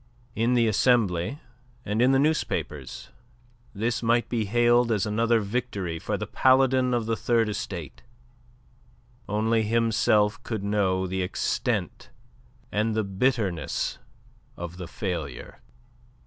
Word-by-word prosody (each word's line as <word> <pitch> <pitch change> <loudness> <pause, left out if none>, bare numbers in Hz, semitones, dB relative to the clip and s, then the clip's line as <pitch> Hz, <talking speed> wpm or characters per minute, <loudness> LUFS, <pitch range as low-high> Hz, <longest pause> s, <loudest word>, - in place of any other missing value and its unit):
In 115 +3 +1
the 120 -1 +4
Assembly 110 -1 +2 0.5
and 105 +3 0
in 125 +2 +5
the 135 - +4
newspapers 135 - -2 0.7
this 115 +3 -1
might 120 +1 +1
be 115 -3 -1
hailed 120 +2 +3
as 105 -3 +1
another 115 +2 +2
victory 100 -6 -3
for - - -2
the - - -4
Paladin 130 -1 +3
of 120 -2 0
the 115 0 0
Third 115 -1 +1
Estate; 90 -7 -6 1.3
only 110 +2 +1
himself 110 -1 +2
could 110 -5 -4
know 95 -2 +1
the 95 +1 -2
extent 90 - -2 0.6
and 110 +1 0
the 110 - +1
bitternest 100 - -1 0.6
of 85 0 -7
the 90 -2 -6
failure. 85 - -5
110 Hz, 120 wpm, -26 LUFS, 95-120 Hz, 1.3 s, in